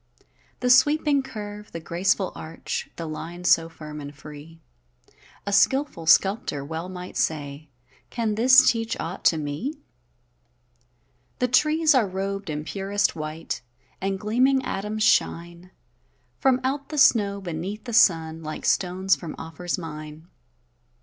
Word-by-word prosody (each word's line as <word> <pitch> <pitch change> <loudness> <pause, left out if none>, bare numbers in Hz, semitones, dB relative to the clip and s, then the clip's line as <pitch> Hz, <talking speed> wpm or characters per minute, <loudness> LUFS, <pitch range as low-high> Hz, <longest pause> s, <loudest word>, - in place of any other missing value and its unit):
The 250 - +1
sweeping 290 +2 +4
curve, 210 -4 -8
the 165 - -4
graceful 180 +3 0
arch, 160 +1 -6
The 165 - -5
line 165 +3 -7
so 165 -2 +4
firm 150 -2 -9
and 145 0 -9
free; 150 +3 -12 0.9
A 200 - -2
skilful 235 - +2
sculptor 180 -6 +3
well 165 +4 -5
might 180 -1 -8
say: 145 -1 -2 0.4
"Can 225 -3 -1
this 255 +4 +6
teach 230 +1 0
aught 170 +3 -5
to 165 - +5
me?" 155 - -4 1.6
The 250 - +1
trees 305 +5 +3
are 250 -6 +3
rob'd 195 0 -4
in 150 0 -3
purest 200 +4 -1
white, 155 +1 -5 0.4
And 195 0 -2
gleaming 255 +6 +2
atoms 210 +2 -2
shine 175 -2 +1 0.7
From 260 -1 +3
out 275 +2 -2
the 305 - -5
snow, 210 -9 +4
beneath 190 +3 -5
the 240 - -7
sun, 165 -7 +3
Like 155 -1 -6
stones 190 +1 +2
from 165 -3 -8
Ophir's 165 +3 -4
mine. 155 -1 -8
190 Hz, 135 wpm, -24 LUFS, 160-230 Hz, 1.6 s, this